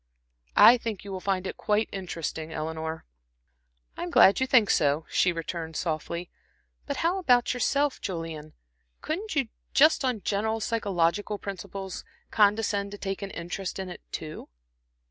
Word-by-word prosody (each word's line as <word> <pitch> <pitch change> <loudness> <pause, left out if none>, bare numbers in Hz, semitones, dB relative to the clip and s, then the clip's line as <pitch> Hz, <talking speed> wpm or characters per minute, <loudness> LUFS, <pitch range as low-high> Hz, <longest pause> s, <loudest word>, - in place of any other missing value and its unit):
I - - +10
I - - +2
think 220 -5 -4
you 200 - -8
will 190 - -4
find 190 -1 -1
it - - -5
quite 210 +1 +1
interesting, 165 -4 -5
Eleanor." 160 +1 -4 0.9
"I'm 175 - -4
glad 195 - +6
you 260 - +1
think 235 -6 +5
so," 145 +1 +2
she 180 - +3
returned, 165 -1 -5
softly. 170 +2 -3 0.6
"But 280 -1 -2
how 360 +3 +2
about 250 -9 +3
yourself, 280 +3 +1
Julian? 165 -5 -5 0.5
Couldn't 360 +4 -3
you 270 -6 +1 0.3
just 310 +1 +5
on 250 -5 0
general 220 +2 0
psychological 205 -2 0
principles 195 -1 -6 0.3
condescend 205 -1 +2
to - - -6
take 195 0 -4
an 200 - -4
interest 180 +2 -5
in 190 -1 -5
it, 180 - -9
too?" 155 -1 -6
195 Hz, 150 wpm, -27 LUFS, 170-225 Hz, 0.9 s, I